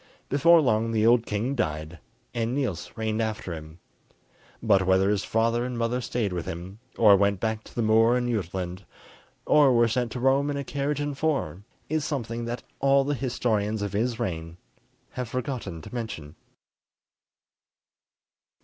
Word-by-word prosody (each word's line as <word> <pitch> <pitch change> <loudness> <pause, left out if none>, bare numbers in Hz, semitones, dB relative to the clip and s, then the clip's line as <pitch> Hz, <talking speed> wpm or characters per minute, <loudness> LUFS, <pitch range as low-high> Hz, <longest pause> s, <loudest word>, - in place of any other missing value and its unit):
Before 165 +5 +5
long 115 -4 +1
the 110 -1 +2
old 115 0 +4
king 110 +6 -1
died, 80 - -3 0.3
and 115 +1 -1
Niels 125 - -2
reigned 110 0 -1
after 110 -5 -3
him; 80 0 -9 0.8
but 100 -4 +3
whether 95 +1 +4
his 105 -1 0
father 115 +1 +1
and 125 -1 -4
mother 120 +2 0
stayed 115 -4 -2
with 85 -2 -4
him, 90 +5 -7 0.2
or 105 -3 +7
went 100 0 +2
back 110 0 -2
to - - -15
the 120 - 0
moor 115 +2 +4
in 125 0 -1
Jutland, 95 -4 -3 0.6
or 145 -3 +5
were 120 -1 +4
sent 120 +1 -1
to 125 - -4
Rome 135 +3 +2
in 145 - -2
a 140 - -3
carriage 140 +1 -2
and 145 -1 -2
four, 135 - -1 0.3
is 155 0 -1
something 120 -6 -3
that 120 0 -4 0.2
all 135 0 +4
the 145 +2 -1
historians 110 -5 -1
of 100 -1 -3
his 115 +3 -1
reign 85 -6 -4 0.5
have 125 -2 -5
forgotten 120 - -4
to - - -11
mention. 110 -11 -5
115 Hz, 165 wpm, -26 LUFS, 100-125 Hz, 0.8 s, or